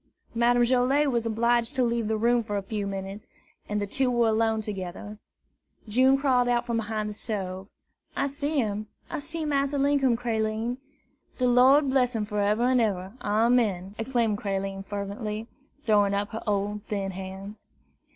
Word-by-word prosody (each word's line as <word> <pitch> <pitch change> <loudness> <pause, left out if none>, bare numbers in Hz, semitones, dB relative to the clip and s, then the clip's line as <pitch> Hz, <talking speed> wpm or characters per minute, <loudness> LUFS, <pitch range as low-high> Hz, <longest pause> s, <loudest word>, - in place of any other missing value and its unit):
Madame 240 +1 +3
Joilet 260 +4 +3
was 235 -2 0
obliged 235 +3 +1
to 260 - +2
leave 235 -2 0
the 220 0 0
room 235 +2 +2
for 205 -2 -3
a 200 - -3
few 205 0 -3
minutes, 195 +1 -6 0.4
and 210 0 0
the 205 - -1
two 255 +6 0
were 240 -2 +3
alone 220 0 +2
together. 205 0 -6 0.7
June 260 +5 +4
crawled 255 -3 +2
out 240 0 +1
from 235 -2 -1
behind 215 -1 -2
the 210 - -5
stove. 195 -3 -4 0.5
"I - - +1
see 285 +2 -2
him, 215 -4 -1 0.2
I 325 - -2
see 320 +2 -4
Massa 280 -1 0
Linkum, 275 -3 +2
Creline." 225 0 -1 0.6
"De 255 - +2
Lord 265 +3 +5
bress 250 -2 +2
him 215 -1 -1
foreber'n 210 +4 +2
eber. 195 -4 -1
Amen!" 210 -3 +1
exclaimed 225 -3 0
Creline 195 -1 -3
fervently, 210 +2 -5 0.4
throwing 205 -2 +3
up 205 +1 -1
her 225 - -5
old 205 0 -1
thin 195 -2 -3
hands. 190 +2 -8
225 Hz, 160 wpm, -27 LUFS, 205-250 Hz, 0.7 s, Lord